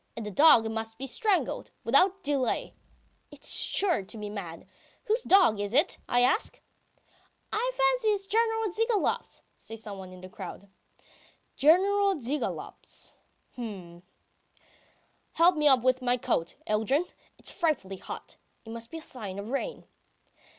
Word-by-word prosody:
And 225 - -4
the 210 - -5
dog 230 - +6
must 225 0 -5
be 270 - -5
strangled. 400 - 0
Without 365 +10 +3
delay! 275 -4 -1 0.6
It's - - -7
sure 375 - +2
to 205 +4 -11
be 210 -1 -6
mad.... 175 -6 -7 0.4
Whose 455 0 0
dog 370 - +5
is 205 +3 -2
it, 295 - +3
I 245 - +3
ask?" 255 - +1 0.9
"I 485 +4 0
fancy - - +2
it's 410 -2 +1
General 445 0 +1
Zhigalov's," 450 +2 -1
says 225 0 -9
someone 195 -3 -8
in 185 0 -12
the 185 - -9
crowd. 195 0 -9 0.9
"General 390 +6 +4
Zhigalov's, 285 0 -4 0.4
h'm.... 190 -8 -8 1.3
Help 345 +2 +5
me 300 -1 +3
off 260 -4 +5
with 255 0 +2
my 250 0 +1
coat, 165 -8 -1
Yeldyrin... 220 - +1 0.3
it's - - -5
frightfully 240 - -1
hot! - - -9 0.3
It 225 - -9
must 230 0 -6
be 325 - -7
a - - -8
sign 205 -10 -7
of 205 +4 -6
rain. 470 - -3
255 Hz, 145 wpm, -28 LUFS, -, 1.3 s, dog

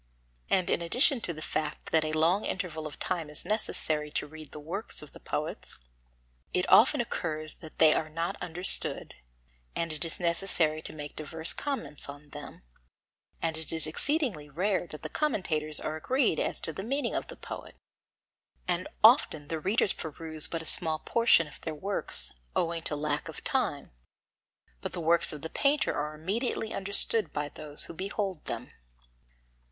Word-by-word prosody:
And 185 -2 +2
in - - +1
addition 245 - +3
to 175 - -3
the 155 -1 -8
fact 150 0 -4
that 160 -1 +3
a 155 - -2
long 165 +6 +2
interval 160 -5 -4
of 145 - -11
time 170 -5 -3
is 150 - -4
necessary 155 -8 0
to - - -2
read 155 -1 -12
the 150 - -8
works 175 +5 -6
of 150 - -14
the - - -13
poets, - - -3 0.8
it 180 - +1
often 265 +6 +6
occurs 155 -8 -3
that 160 - -12
they 155 -1 +6
are 155 - -2
not 165 +2 -3
understood, 180 +1 +2 0.6
and 165 -1 -2
it 155 - -1
is 165 - -1
necessary 170 -3 0
to - - -3
make 150 -1 -8
diverse 160 +2 -2
comments 160 - -4
on 145 +1 -11
them, 145 - -10 0.8
and 160 -1 -1
it 160 -1 -1
is 160 -1 +1
exceedingly 205 - +1
rare 185 +4 -1
that 150 - -9
the - - -3
commentators 155 - 0
are 155 - -4
agreed 250 - +1
as - - +1
to 165 - +5
the 170 - -6
meaning 275 +7 -2
of - - -3
the - - -10
poet; - - -9 0.9
and 180 0 -1 0.2
often 215 - +5
the 160 - -2
readers 195 +4 +1
peruse 160 0 0
but 165 -1 -4
a - - -11
small 160 -1 +6
portion 230 -2 +3
of 150 - -15
their 160 -2 -5
works, 150 - -1 0.2
owing 170 0 0
to 155 - -4
lack 150 0 -2
of - - -9
time. - - -2 0.9
But - - -5
the - - -4
works 170 +1 +2
of 150 -1 -8
the 160 - -4
painter 285 +1 +1
are 150 +1 -3
immediately 220 - -2
understood 200 0 +5
by 145 -1 -3
those 150 0 +6
who - - -7
behold 190 -1 -4
them. - - -6
160 Hz, 175 wpm, -29 LUFS, 155-195 Hz, 0.9 s, often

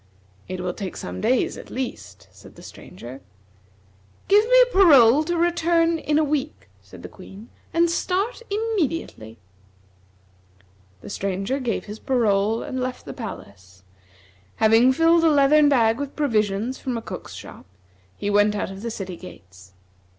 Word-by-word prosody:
"It 185 - -6
will 180 -1 -3
take 190 -2 -7
some 90 +1 -7
days, - - 0
at - - -11
least," - - -7
said - - -17
the - - -14
Stranger. 120 +8 -11 1.1
"Give 410 +2 +5
me - - +6 0.2
your 390 - +5
parole 275 -2 +6
to 345 +1 -2
return 335 -1 +1
in 300 -1 0
a 310 - +3
week," 300 - -3
said 95 -3 -15
the - - -6
Queen, 195 - -13 0.2
"and 335 +1 +2
start 380 +8 -2
immediately." 335 - -3 1.6
The - - -10
Stranger 195 +7 -3
gave 245 -4 -3
his 210 +1 -9
parole 220 -3 0
and 265 -3 -5
left 255 0 -5
the - - -7
palace. 95 - -10 0.7
Having 225 +4 +4
filled 330 +3 +3
a 325 - +5
leathern 290 0 +4
bag 230 -3 +2
with 285 -1 -5
provisions 220 -3 -1
from 250 -3 -3
a - - -5
cook's - - -8
shop, - - -12 0.5
he 205 - -3
went 205 +1 +3
out 200 - -3
of 195 0 -9
the 235 - -4
city 190 -5 -6
gates. 95 - -14
235 Hz, 155 wpm, -23 LUFS, 195-310 Hz, 1.6 s, me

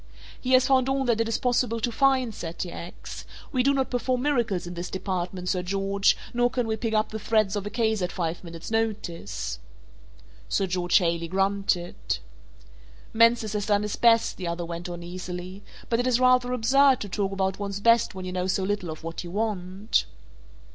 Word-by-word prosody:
"He 255 0 0
has 255 0 +6
found 260 -1 +3
all 270 0 +1
that 230 -2 +2
it 225 - 0
is 230 - +1
possible 245 -2 +1
to 235 +2 -1
find," 260 -1 +2
said 170 -3 -6
T. 175 - -4
X. 170 +1 -8 0.3
"We 255 - +2
do 275 +2 +4
not 270 -2 0
perform 250 0 0
miracles 235 -11 +1
in 175 - -6
this 175 +1 -5
department, 185 -1 -3
Sir 180 - +1
George, 195 +2 +1 0.2
nor 245 0 +3
can 245 -1 -1
we 220 -1 -1
pick 220 0 -2
up 215 0 +2
the 220 - -5
threads 215 -2 +2
of 205 0 -3
a - - -2
case 220 -1 0
at 180 - -1
five 170 -1 -3
minutes' 170 +3 -8
notice." 170 - -2 0.9
Sir 195 - +1
George 180 -1 +2
Haley 170 -2 0
grunted. 185 - 0 1.0
"Mansus 230 -1 +4
has 205 -1 -2
done 205 -1 +2
his 210 - -2
best," 230 -1 +4
the 180 - -4
other 170 0 -3
went 170 +1 -6
on 175 0 -6
easily, 180 +2 -6 0.3
"but 230 - +1
it 245 - +1
is 250 -1 +3
rather 255 -1 +4
absurd 260 +2 +4
to 205 - -4
talk 195 +1 -1
about 190 0 -1
one's 200 -1 -3
best 230 -1 +3
when 185 -1 -6
you 180 - -4
know 180 0 -1
so 190 0 0
little 200 -2 -2
of 160 0 -7
what 165 +1 -5
you 175 - -7
want." 200 0 -1
200 Hz, 200 wpm, -26 LUFS, 180-235 Hz, 1.0 s, has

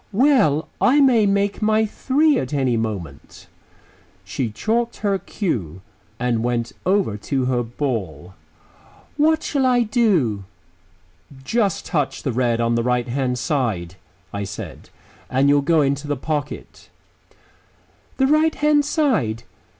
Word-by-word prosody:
"Well, 205 - +3
I 270 +4 +4
may 245 -7 +4
make 200 +1 0
my 215 +1 +3
three 280 +7 +2
at 130 +3 -4
any 130 -4 +1
moment." 100 -11 -5 0.8
She 115 +5 -3
chalked 230 - -1
her 200 -1 +1
cue 95 - -4 0.4
and 120 -2 0
went 120 -1 -1 0.2
over 190 - +1
to 130 +5 -2
her 125 -1 +1
ball. 115 - -4 0.8
"What 315 +1 +3
shall 280 -3 0
I 250 -1 +3
do?" 190 - +1 1.0
"Just 200 - 0
touch 145 -4 -2
the 135 - -1
red 120 -1 +1
on 115 0 +1
the 115 - +1
right 125 0 0
hand 125 0 -1
side," 115 - -1 0.4
I 100 0 -3
said, 100 +1 -8 0.4
"and 135 +2 +2
you'll 145 0 +4
go 160 +2 +3
into 140 +1 -1
the 145 -1 -1
pocket." 150 +1 -5 1.3
"The 265 - +3
right 310 +3 +3
hand 295 0 +3
side? 250 - 0
140 Hz, 135 wpm, -21 LUFS, -, 1.3 s, I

